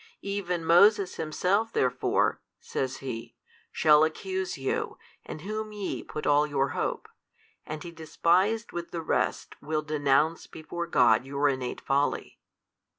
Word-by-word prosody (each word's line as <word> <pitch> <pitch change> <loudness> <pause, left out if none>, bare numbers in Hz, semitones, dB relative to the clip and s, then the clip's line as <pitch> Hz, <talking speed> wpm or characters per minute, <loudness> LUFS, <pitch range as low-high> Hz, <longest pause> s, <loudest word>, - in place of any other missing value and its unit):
Even 180 -4 -2
Moses 195 +3 +5
himself 185 +8 0
therefore 130 - +1 0.2
(says 130 0 -3
He) 115 -1 -6 0.4
shall 150 -1 +5
accuse 185 +4 -2
you, 135 -1 -2 0.3
in - - -6
whom 215 +6 -5
ye 205 -2 -4
put 150 - -6
all 145 +1 +4
your 140 -2 0
hope, - - -3 0.6
and 155 +2 -5
he 170 - -7
despised 180 +7 +1
with 170 0 -5
the 165 -1 -5
rest - - -1
will 155 +1 -2
denounce 150 +1 +1
before 170 +2 -6
God 120 -7 +4
your 140 +2 0
innate 130 -2 -3
folly. 140 +1 -1
155 Hz, 135 wpm, -28 LUFS, 140-185 Hz, 0.6 s, Moses